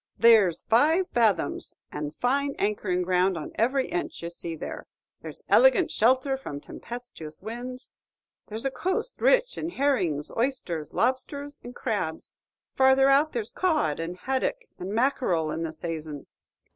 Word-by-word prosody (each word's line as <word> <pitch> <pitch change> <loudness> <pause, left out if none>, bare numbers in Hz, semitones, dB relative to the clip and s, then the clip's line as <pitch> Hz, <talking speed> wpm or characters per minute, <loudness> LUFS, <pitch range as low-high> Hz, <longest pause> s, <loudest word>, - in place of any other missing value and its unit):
"There's 220 -7 +5
five 315 +11 +3
fathoms, 210 -10 +1 0.2
and 150 0 -5
fine 280 +3 0
anchoring 185 -3 0
ground 180 0 +2
on 155 - -6
every 260 +4 +1
inch 175 - -4
ye 170 - -4
see 170 -1 -5
there. - - -7 0.3
There's - - -7
elegant - - +5
shelter 260 +4 +3
from 145 - -7
tempestuous 235 -6 -8
winds. 250 +4 -7 0.6
There's 220 +4 -2
a 270 - +1
coast 375 - -2
rich - - +3
in 325 - -3
herrings, 250 - 0
oysters, 225 - -2
lobsters, 280 +4 -1
and 245 0 -9
crabs; 200 -9 -3 0.3
farther 265 +1 +4
out 285 +3 +4
there's 230 -3 -2
cod, 310 - +1
and 170 +2 -4
haddock, 270 - -1 0.2
and 185 +2 -5
mackerel 215 - +1
in 165 - -3
the 165 -1 -2
sayson. 155 -2 -5
235 Hz, 145 wpm, -27 LUFS, 170-275 Hz, 0.6 s, There's